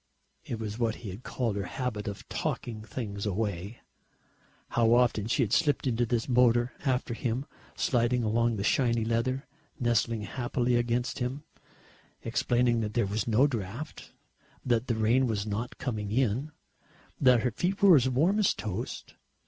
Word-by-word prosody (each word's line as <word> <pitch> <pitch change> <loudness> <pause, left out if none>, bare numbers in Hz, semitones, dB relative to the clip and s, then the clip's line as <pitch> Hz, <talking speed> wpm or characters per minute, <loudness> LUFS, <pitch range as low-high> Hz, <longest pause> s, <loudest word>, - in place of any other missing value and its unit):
It 115 - -4
was 110 0 -5
what 115 -2 +1
he 100 - -4
had 100 +6 -9
called 120 -5 -2
her 100 - -2
habit 110 -2 -4
of 100 -1 -6
talking 110 -3 -3
things 105 -2 -5
"away." 100 0 -3 0.9
How 115 0 +3
often 120 -4 +2
she 115 - +2
had 105 - -2
slipped 150 -4 +2
into 120 -2 +1
his 115 -2 0
motor 120 -1 +3
after 125 -3 0
him, 125 +2 -2 0.3
sliding 120 -1 +1
along 115 +1 +1
the 100 - -3
shiny 115 -1 +2
leather, 120 +4 0 0.3
nestling 115 -2 +1
happily 120 +2 -1
against 120 +1 0
him, 130 +4 -3 0.8
explaining 120 -1 +1
that 105 0 -4
there 120 - +2
was 105 +2 -2
no 115 +4 +4
draught, 120 +3 -5 0.5
that 120 -1 +1
the 115 - +1
rain 115 +4 +3
was 105 -3 -1
not 110 +3 -4
coming 105 -5 -3
in, 130 +4 0 0.7
that 125 -4 +5
her 125 - +1
feet 180 - -1
were 190 -4 +9
as 130 -2 +4
warm 165 +12 +2
as 205 - +3
toast. 105 +3 -5
120 Hz, 160 wpm, -29 LUFS, 110-125 Hz, 0.9 s, were